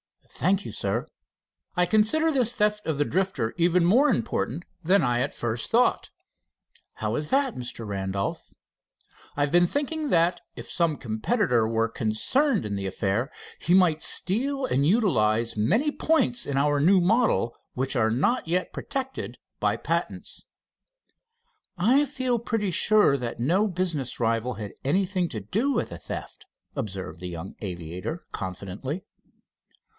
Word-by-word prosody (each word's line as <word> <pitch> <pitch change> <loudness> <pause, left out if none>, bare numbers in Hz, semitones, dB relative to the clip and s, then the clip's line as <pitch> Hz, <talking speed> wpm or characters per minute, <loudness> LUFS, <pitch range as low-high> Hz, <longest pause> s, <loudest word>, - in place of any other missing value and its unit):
"Thank 195 +3 +1
you, - - -5
Sir." - - -1 0.7
"I 180 -1 +3
consider 220 - +3
this 250 -5 +2
theft 210 0 0
of 160 -3 0
the 145 - +2
Drifter 185 -12 -1
even 175 0 +3
more 255 +11 +5
important 125 - -1 0.2
than 190 +5 +4
I 120 -1 +1
at 135 +3 -1
first 115 0 -2
thought." 240 +2 +2 0.9
"How - - -2
is 150 0 -2
that, 270 -2 +2
Mr. 120 -2 -6
Randolph?" 100 -1 -3 0.9
"I - - 0
have 145 0 +1
been 175 0 +5
thinking 295 - -2
that 170 -1 +2
if - - -8
some 165 -4 +1
competitor 120 - +1
was 115 0 0
concerned 210 - +1
in 100 -1 -3
the 100 -1 -3
affair, 105 - -1 0.3
he 175 - +3
might 175 -5 +4
steal 265 +8 -1
and 140 - +1
utilize 115 - +2
many 220 - +2
points 255 -7 +1
in 140 - -1
our 145 +1 +2
new 185 +6 +5
model 190 - +2 0.2
which 135 +2 0
are 110 -3 +3
not 160 - +1
yet 180 +2 -1
protected 265 -1 -4 0.2
by - - +1
patents." - - -3 1.3
"I 250 +11 +4
feel 255 -3 -1
pretty 220 -4 -1
sure 210 -5 +4
that 120 -4 -4
no 180 - +2
business 175 - -2
rival 115 +1 0
had 105 -3 -7
anything 185 +4 +1
to 110 - -4
do 215 - 0
with - - -1
the - - -8
theft," - - -8 0.3
observed 95 - -5
the 90 0 -5
young 85 +2 -7
aviator 90 - -5
confidently. 100 - -5
165 Hz, 150 wpm, -26 LUFS, -, 1.3 s, more